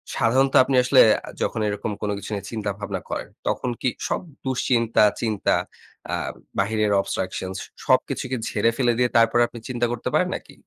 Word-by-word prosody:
সাধারণত 130 +4 +2
আপনি 135 0 0
আসলে 130 +1 +6 0.4
যখন 110 - -1
এরকম 105 +1 -3
কোনো 105 -1 -1
কিছু 100 - -8
নিয়ে 100 -1 -4
চিন্তা 105 -3 -3
ভাবনা 100 -3 -4
করেন - - -4 0.2
তখন 125 - -1
কি 130 - +2 0.2
সব - - -1 0.2
দুশ্চিন্তা 120 -4 +2 0.2
চিন্তা 110 -4 +1 0.6
আ - - +2 0.4
বাহিরের 105 +1 +1
অবস্ট্রাকশনস 95 0 -3 0.3
সবকিছু - - +1
কি 130 - 0
ঝেড়ে 115 +2 +2
ফেলে 120 -3 +3
দিয়ে 125 -1 +2
তারপরে 115 +1 +4
আপনি 120 - -10
চিন্তা 120 -1 0
করতে 120 - -3
পারেন - - +2
নাকি? - - -9
115 Hz, 170 wpm, -23 LUFS, 105-125 Hz, 0.6 s, আসলে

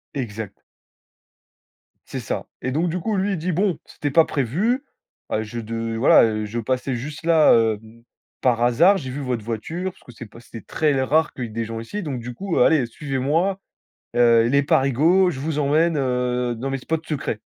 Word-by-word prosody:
Exact. 110 -5 -5 1.5
C'est - - -5
ça. - - -4 0.2
Et 130 - -2
donc 165 +5 0
du 180 - -2
coup, 205 +3 -1
lui, 195 +2 0
il 190 - -2
dit: 180 +3 -2
«Bon, 185 +2 0
c'était 145 -2 -4
pas 165 +3 +5
prévu, 185 - 0 0.5
heu, 110 - 0
je 110 +2 -6
de 115 0 -4
voilà, 120 - +6
heu, 110 -1 0
je 115 +3 -4
passais 130 +2 -2
juste 150 +6 -7
là, 165 -2 +5
hem, 110 0 0 0.4
par 120 -2 +2
hasard, 170 +12 +5
j'ai 135 -7 -6
vu 135 +3 -5
votre 125 -5 -3
voiture, 160 - -4
parce - - -24
que - - -13
c'est 120 0 -10
pas 115 - -14
c'était 115 -1 -11
très 150 +5 0
rare 155 +4 +2
qu'il 125 - -4
y - - -6
ait - - -12
des 115 +1 -3
gens 115 0 -5
ici, 200 - -5
donc 140 -6 -4
du 120 +1 -7
coup, 195 +1 -3
heu, - - +6
allez, 150 -6 +4
suivez-moi, 150 +9 -1 0.6
heu, 115 -1 +5
les 140 +4 +3
Parigos, 150 +8 +3
je 130 - -6
vous 150 +1 -2
emmène, 155 +3 +2
heu, 125 -2 0
dans 130 +4 -4
mes 135 - -2
spots 160 +5 -3
secrets». 135 -7 -3
130 Hz, 205 wpm, -22 LUFS, 115-160 Hz, 1.5 s, voilà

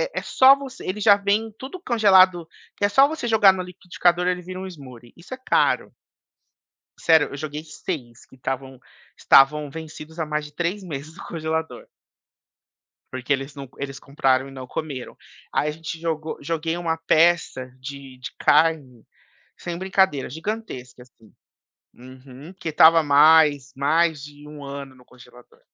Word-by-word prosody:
é - - -1
só 265 +1 +6
você, 275 -2 -10
ele 195 +3 -3
já 205 -1 +7
vem 205 +2 -1
tudo 275 +8 -8
congelado 190 - +4 0.3
que - - -6
é - - +2
só 270 +6 +5
você 310 -5 -5
jogar 210 -4 +5
no 185 - -4
liquidificador 180 -1 -1
ele 180 0 -1
vira 185 +1 -8
um 190 - -6
smoothie, 130 -9 -13
isso 175 +9 -11
é - - -6
caro. 260 - 0 1.1
Sério, 160 -2 +4
eu 140 - -7
joguei 150 +1 -6
6 135 -7 -7
que 130 - -19
estavam 130 0 -5 0.4
estavam 145 +2 +4
vencidos 160 +1 -10
há 160 - -2
mais 150 0 -2
de 150 - -12
3 175 +5 -2
meses 155 -2 -8
no - - -10
congelador 160 0 -4 1.3
porque 130 +2 -3
eles 135 +1 -3
não 140 -2 -9
eles 135 -1 -6
compraram 135 -2 0
e - - -11
não 130 -1 -9
comeram. 135 -1 -6 0.4
Aí 150 - 0
a 150 - -2
gente 160 +1 -7
jogou 160 -1 -4
joguei 165 +2 -2
uma 165 -2 -2
peça 160 -5 +1
de 135 -1 -10
de 125 0 -7
carne, 150 -6 +2 0.5
sem 175 -1 -6
brincadeira 190 -6 +1
gigantesca, 150 - -7
assim. 115 -3 -23 0.6
Uhum, 130 +5 -13
porque 170 -3 -5
estava 160 +2 +6
há - - -1
mais 145 -1 +4
mais 155 +2 +1
de 145 0 -12
1 150 -1 -10
ano 140 -1 -8
no 125 -1 -20
congelador. 125 -1 -19
155 Hz, 165 wpm, -23 LUFS, 135-180 Hz, 1.3 s, já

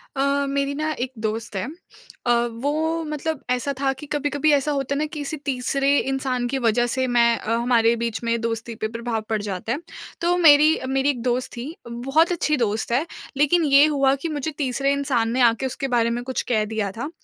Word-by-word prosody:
अ, 280 +1 +1
मेरी 280 0 -1
ना 310 +1 -1
एक 250 +1 -2
दोस्त 220 0 -3
है। 195 +5 -2 0.6
अ, 240 - +3 0.3
वो 285 - +2 0.3
मतलब 305 0 -3
ऐसा 250 +3 0
था 270 -1 +2
कि 265 +3 -10
कभी-कभी 290 +1 +1
ऐसा 285 +1 +2
होता 275 -1 -1
है - - -1
ना, 305 - +1
किसी 300 0 -5
तीसरे 275 +1 +1
इंसान 265 -2 -1
के 270 +2 -2
वजह 240 +2 +3
से 260 +1 0
मैं 245 -1 +3 0.2
अ, 225 - -3
हमारे 235 -1 +3
बीच 230 -1 -3
में 235 0 0
दोस्ती 230 0 -3
पे 220 0 -2
प्रभाव 230 0 -3
पड़ 220 -2 0
जाता 200 +1 -4
है। 275 - -1 0.4
तो 345 +1 +2
मेरी 305 -3 +7 0.2
मेरी 270 +1 +1
एक 250 -4 -1
दोस्त 250 +1 -1
थी, 235 - -4 0.2
बहुत 270 +9 +1
अच्छी 305 -3 +1
दोस्त 220 -2 -1
है, 260 +7 +2 0.3
लेकिन 315 +4 +3
ये 280 +1 +6
हुआ 275 -3 +3
कि 275 +5 -5
मुझे 300 0 -3
तीसरे 275 0 0
इंसान 265 -5 0
ने 255 - 0
आके 235 +2 +3
उसके 270 +1 -3
बारे 235 -1 +3
में 240 +1 -2
कुछ 260 +1 -2
कह 215 -3 +3
दिया 215 -2 -2
था 240 +9 -5
265 Hz, 210 wpm, -23 LUFS, 235-285 Hz, 0.6 s, मेरी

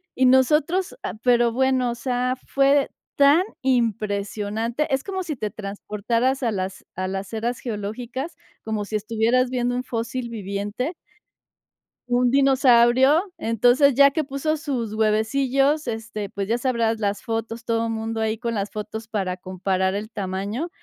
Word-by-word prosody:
y 260 - +3
nosotros 300 +8 +3
ah, 185 - -3
pero 240 -1 +3
bueno, 255 0 +1
o - - -4
sea, 250 +1 -1
fue 275 +1 +3 0.3
tan 285 +5 +6 0.2
impresionante. 225 0 -1
Es 270 - +1
como 380 -1 -3
si 310 -4 -4
te 215 -3 -3
transportaras 225 +6 -2
a 235 - +1
las 190 -2 -4
a 185 0 -2
las 195 +3 -5
eras 235 +2 -2
geológicas, 240 +7 -5 0.3
como 215 -2 -2
si 215 - -5
estuvieras 230 +4 +1
viendo 245 -1 -1
un 250 - -2
fósil 235 +1 -4
viviente 205 - -3 1.2
un 245 0 +3
dinosaurio. 265 +1 +5 0.2
Entonces, 245 +3 +4
ya 280 +1 +7
que 315 +2 0
puso 280 +3 -2
sus 260 -8 -3
huevecillos, 265 +7 +1
este, 220 -3 -4
pues 200 0 -4
ya 230 - +1
sabrás, 235 -3 0
las 205 -1 -1
fotos, 225 0 -4
todo 230 0 0
mundo 225 0 -3
ahí 220 0 0
con 235 0 -3
las 200 0 -2
fotos, 220 +1 -6
para 195 -5 -2
comparar 190 +1 -1
el 210 +2 -4
tamaño, 200 - -3
235 Hz, 150 wpm, -23 LUFS, 215-260 Hz, 1.2 s, ya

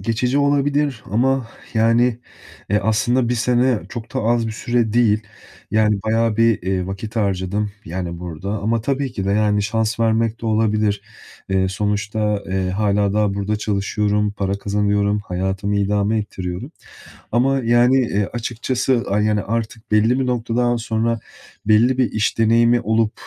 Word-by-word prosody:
geçici 125 +4 0
olabilir 145 -3 +1
ama, 130 +2 +1 0.3
yani, 115 +2 +3 0.5
eee, 105 - +3
aslında 120 +3 +1
1 125 - +1
sene 125 0 +2
çok 115 0 -8
da - - 0
az 115 0 +1
bir 110 - -3
süre 120 -1 0
değil. 110 -3 +3 0.5
Yani, 105 -1 +2
bayağı 115 0 +1
bir, 115 -4 +3
eee, 95 -1 -1
vakit 105 +4 -6
harcadım, 100 0 -1
yani, 85 0 -5
burada 90 +2 -6
ama 110 +2 0
tabii 135 +1 -2
ki 100 -5 -4
de, 100 - 0
yani, 105 0 +2
şans 110 +2 -1
vermek 115 0 +1
de - - -3
olabilir. 110 -2 +1 0.5
Eee, 95 -1 +1
sonuçta, 105 +1 -1
eee, 95 -1 -1
hâlâ 100 0 +1
daha 105 -2 +1
burada 100 +1 -1
çalışıyorum, 105 0 0
para 100 -1 -2
kazanıyorum, 100 0 +1
hayatımı 95 +2 -2
idame 105 +2 +1
ettiriyorum 90 -3 -5 0.6
ama, 135 +4 +2
yani, 120 +2 +4
eee, 105 -5 +1
açıkçası, 120 +1 -1
yani, 105 0 +2
artık 110 0 -4
belli 110 +4 +3
bir 130 - 0
noktadan 120 0 0
sonra 115 0 -1 0.5
belli 115 +4 +4
bir 125 -3 +1
iş 110 +1 0
deneyimi 115 +2 +4
olup, 110 +1 +1
110 Hz, 150 wpm, -20 LUFS, 100-120 Hz, 0.6 s, yani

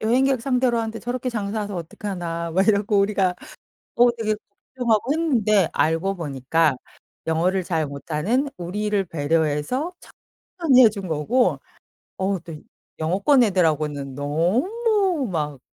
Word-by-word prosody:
여행객 255 +3 +2
상대로 250 -2 +1
하는데 225 0 -3
저렇게 250 +1 -3
장사해서 205 -2 -3
어떡하나?" 170 -1 -5
막 190 +3 +2
이러고 205 0 +3
우리가 195 -2 +2 0.6
어 240 0 +5
되게 215 -1 0 0.4
걱정하고 240 +1 +1
했는데 220 - +2
알고 165 +5 +1
보니까 150 -1 0 0.5
영어를 175 +4 +1
잘 160 -3 -1
못하는 170 - -1
우리를 200 +3 -1
배려해서 160 - -1 0.7
천천히 265 -7 +6
해준 200 -4 0
거고 190 +12 +1 0.6
어 190 -1 -1
또 165 -1 -9 0.4
영어권 200 - +3
애들하고는 155 - 0
너무 285 - 0
막 150 -4 -3
200 Hz, 290 characters per minute, -23 LUFS, 165-240 Hz, 0.7 s, 천천히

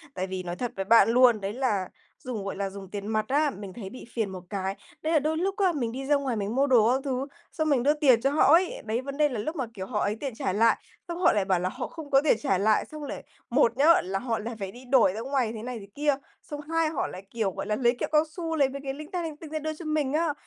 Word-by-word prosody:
tại 185 +1 -2
vì 185 -1 -4
nói 175 0 -4
thật 245 +1 -3
với 195 0 -3
bạn 225 0 +6
luôn, 240 -3 +5
đấy 195 +2 -3
là 215 -8 0 0.3
dùng, 230 -6 -5
gọi 195 - -3
là, 195 0 -2
dùng 195 -1 -10
tiền 205 0 -5
mặt 215 -1 0
á, 295 +2 +2
mình 200 -6 -8
thấy 200 -5 -7
bị 255 - -10
phiền 220 -4 0
một 185 -1 -8
cái, 195 -1 -2 0.3
đấy 320 +1 0
là 310 - +5
đôi 310 +2 -1
lúc 385 +3 0
á, 385 -3 +3
mình 240 -6 -2
đi 270 +2 -5
ra 290 +1 +3
ngoài 270 -4 -1
mình 210 +1 -2
mua 275 +2 +3
đồ 235 -4 +5
các 265 - 0
thứ, 265 0 -2 0.2
xong 315 -2 -1
mình 260 -4 +3
đưa 290 - +4
tiền 270 -6 +4
cho 275 - +2
họ 300 +1 +5
ấy, 355 +2 +3
đấy, 225 +3 -1
vấn 275 +1 -6
đề 300 -1 +4
là 245 -5 -4
lúc 310 +10 -3
mà, 265 -6 -2
kiểu, 190 -4 -6
họ 210 -2 -2
ấy 205 +1 0
tiền 265 +1 -5
trả 190 -4 -1
lại, 230 +2 +4 0.3
xong 340 -1 -4
họ - - +5
lại 205 -2 +1
bảo 190 -2 +2
là 180 +1 -1
họ - - -5
không 315 -3 -10
có 270 0 +6
tiền 300 - +3
trả 195 -10 +1
lại, 210 +3 +2
xong 305 -1 -9
lại 285 - -6 0.3
một 245 -1 +3
nhớ, 315 +5 +6
là 195 +2 -2
họ 235 -3 -2
lại 230 +2 -5
phải 195 -1 -4
đi 245 +5 -13
đổi 245 -7 +4
ra 215 - -5
ngoài 260 -3 0
thế 220 -1 -7
này 245 -1 -5
thế 200 - -11
kia, 290 -1 +2 0.3
xong 295 -1 -7
hai 325 +1 0
họ 310 - -2
lại, 185 - -9
kiểu, 220 -4 -1
gọi - - -5
là, 210 - 0
lấy 240 +1 +2
kẹo - - -2
cao 305 0 +5
su 330 -2 -3
lấy 280 -4 +3
mấy 275 +1 -7
cái 270 -1 -3
linh 305 +4 -9
ta 360 -2 -2
linh 315 -3 -5
tinh 315 0 -10
ra 310 +1 -3
đưa 310 +1 -3
cho 315 +2 -10
mình 305 -3 0
á. 315 -1 +1
255 Hz, 310 wpm, -27 LUFS, 210-295 Hz, 0.3 s, bạn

